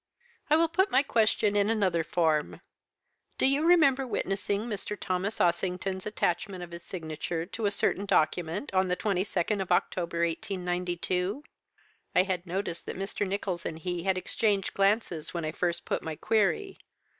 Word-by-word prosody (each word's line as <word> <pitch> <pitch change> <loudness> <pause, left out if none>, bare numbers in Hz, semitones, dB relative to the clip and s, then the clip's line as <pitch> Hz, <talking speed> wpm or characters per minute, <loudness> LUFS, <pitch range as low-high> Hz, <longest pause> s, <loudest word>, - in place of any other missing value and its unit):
"'I 300 - +6
will 330 +1 +4
put 375 +5 +2
my 275 - +4
question 215 -4 +2
in 205 +1 +3
another 190 -7 +2
form. 160 -2 +1 0.8
Do - - +2
you 275 +3 +3
remember 280 -6 +5
witnessing 200 -2 -1
Mr. 210 -2 -4
Thomas 190 +2 -2
Ossington's 185 +2 0
attachment 185 -2 -1
of 175 - -9
his 170 0 -7
signature 165 -1 -4
to 210 +3 -2
a - - +3
certain 200 0 0
document 180 - +1
on 185 0 +3
the 180 0 0
22nd 195 0 0
of 190 - -4
October, 170 -1 +1
1892?' 180 - -2 0.7
"I 180 - +6
had 185 -2 -3
noticed 175 -1 -3
that - - -4
Mr. 195 +1 -2
Nicholls 190 -3 -2
and 160 - -4
he 175 +1 -3
had 190 +1 +1
exchanged 200 0 0
glances 195 -5 +1
when 170 -2 -2
I 155 - -1
first 170 +1 -2
put - - -1
my 160 -1 -4
query. 225 - +1
190 Hz, 160 wpm, -29 LUFS, 175-210 Hz, 0.8 s, I